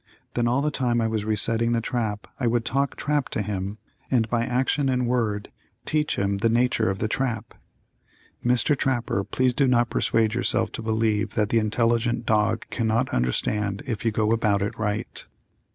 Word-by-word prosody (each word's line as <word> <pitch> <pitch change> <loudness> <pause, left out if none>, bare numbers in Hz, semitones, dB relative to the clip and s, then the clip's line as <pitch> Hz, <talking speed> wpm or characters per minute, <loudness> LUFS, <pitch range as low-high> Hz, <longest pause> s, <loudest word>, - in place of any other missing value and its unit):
Then 120 -1 +1
all 125 +4 +1
the 150 - +1
time 125 -4 +1
I 115 - +1
was 110 -2 -1
resetting 115 +2 +1
the 115 - +2
trap 115 -3 -2
I 125 - +1
would 115 0 +1
talk 140 +2 0
trap 145 -2 -1
to 105 - -2
him, 100 0 -4 0.3
and 115 -4 +2
by 120 -1 +2
action 130 +2 +1
and 125 -1 +1
word 115 -4 -1 0.3
teach 150 -1 0
him 100 0 0
the 115 +3 +2
nature 115 -2 +2
of 95 - -2
the 110 - -1
trap. 115 -2 -2 0.9
Mr. 125 +4 +3
Trapper, 120 -7 0
please 130 +4 +1
do 140 +1 +2
not 120 -2 +2
persuade 110 -1 +2
yourself 120 -1 +1
to - - -6
believe 110 -1 0
that 105 -1 +1
the 115 - +3
intelligent 115 +2 +1
dog 110 +1 +1
cannot 115 +2 0
understand 100 - 0
if 115 -4 -3
you 115 - +2
go 110 0 0
about 105 -3 +2
it 105 - -3
right. 105 0 -3
115 Hz, 185 wpm, -25 LUFS, 105-125 Hz, 0.9 s, Mr